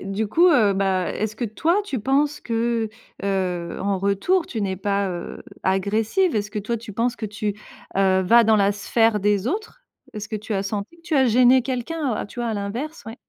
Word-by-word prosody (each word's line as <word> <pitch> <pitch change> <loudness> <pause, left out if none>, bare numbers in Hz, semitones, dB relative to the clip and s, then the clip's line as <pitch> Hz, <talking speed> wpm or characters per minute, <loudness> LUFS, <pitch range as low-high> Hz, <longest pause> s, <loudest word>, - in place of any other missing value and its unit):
du 200 +2 -3
coup 335 - +4
heu, 215 - +4
bah, 190 -2 0
est-ce 215 0 -3
que, 240 - -2
toi, 325 - +1
tu 275 -10 -3
penses 285 +6 +1
que, 230 -1 -1 0.3
heu, 185 -3 -2
en 195 0 0
retour, 200 - +1
tu 225 - -4
n'es 190 -2 -1
pas, 200 +1 0
heu, 175 -2 -6 0.2
agressive? 215 - +1
Est-ce 210 0 -2
que 215 - -4
toi, 235 +4 -2
tu 225 -1 -9
penses 235 +4 0
que 220 - -4
tu, 210 0 -3 0.4
heu, 190 -1 +3
vas 230 +5 +6
dans 220 0 +4
la 200 -1 +3
sphère 225 +2 +2
des 205 0 +1
autres? 440 - -4 0.3
Est-ce 210 0 -6
que 215 - -3
tu 210 +1 -5
as 195 - 0
senti 200 +9 -4
que - - -22
tu 335 -2 -3
as 265 -1 +4
gêné 250 +2 +5
quelqu'un? 260 +1 -2
Tu 205 - -13
vois, 240 - -1
à - - -2
l'inverse? 235 +11 -4
Oui 225 - -6
215 Hz, 210 wpm, -23 LUFS, 200-250 Hz, 0.4 s, vas